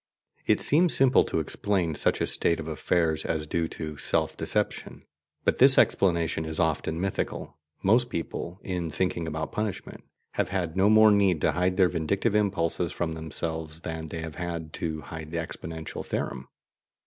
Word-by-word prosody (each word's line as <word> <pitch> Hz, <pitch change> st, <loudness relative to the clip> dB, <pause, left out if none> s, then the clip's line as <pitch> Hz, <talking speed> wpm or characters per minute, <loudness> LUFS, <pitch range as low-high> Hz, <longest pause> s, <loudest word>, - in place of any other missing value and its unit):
It -, -, +4 dB
seems 165 Hz, +4 st, +4 dB
simple 130 Hz, -1 st, +5 dB
to -, -, -1 dB
explain 95 Hz, -6 st, -1 dB
such 70 Hz, -, +1 dB
a -, -, +3 dB
state 85 Hz, -, +1 dB
of 80 Hz, -, -6 dB
affairs 80 Hz, 0 st, 0 dB
as 80 Hz, -1 st, -2 dB
due 80 Hz, +1 st, -1 dB
to 75 Hz, -2 st, -6 dB
"self -, -, +1 dB
deception," -, -, -3 dB, 0.4 s
but -, -, +1 dB
this -, -, +8 dB
explanation 85 Hz, -4 st, +2 dB
is 80 Hz, 0 st, -2 dB
often 80 Hz, 0 st, 0 dB
mythical. 90 Hz, -5 st, -3 dB, 0.2 s
Most 120 Hz, +5 st, +3 dB
people, 85 Hz, +1 st, -5 dB
in 90 Hz, -3 st, -3 dB
thinking 85 Hz, +1 st, -1 dB
about 80 Hz, 0 st, -4 dB
punishment, 105 Hz, -3 st, -4 dB, 0.3 s
have -, -, -1 dB
had 90 Hz, -4 st, -2 dB
no 95 Hz, +2 st, +4 dB
more 110 Hz, 0 st, +7 dB
need 100 Hz, -5 st, +3 dB
to -, -, +3 dB
hide 90 Hz, +1 st, 0 dB
their 95 Hz, -2 st, +5 dB
vindictive 95 Hz, +6 st, 0 dB
impulses 90 Hz, -5 st, 0 dB
from 80 Hz, -2 st, -2 dB
themselves 80 Hz, 0 st, -4 dB
than 80 Hz, -1 st, -5 dB
they 80 Hz, +1 st, -5 dB
have 80 Hz, -2 st, -7 dB
had 85 Hz, -3 st, -5 dB
to 80 Hz, -2 st, -2 dB
hide 80 Hz, 0 st, -8 dB
the 85 Hz, -, -4 dB
exponential 80 Hz, -1 st, -6 dB
theorem. -, -, -4 dB
85 Hz, 170 wpm, -27 LUFS, 80-95 Hz, 0.4 s, this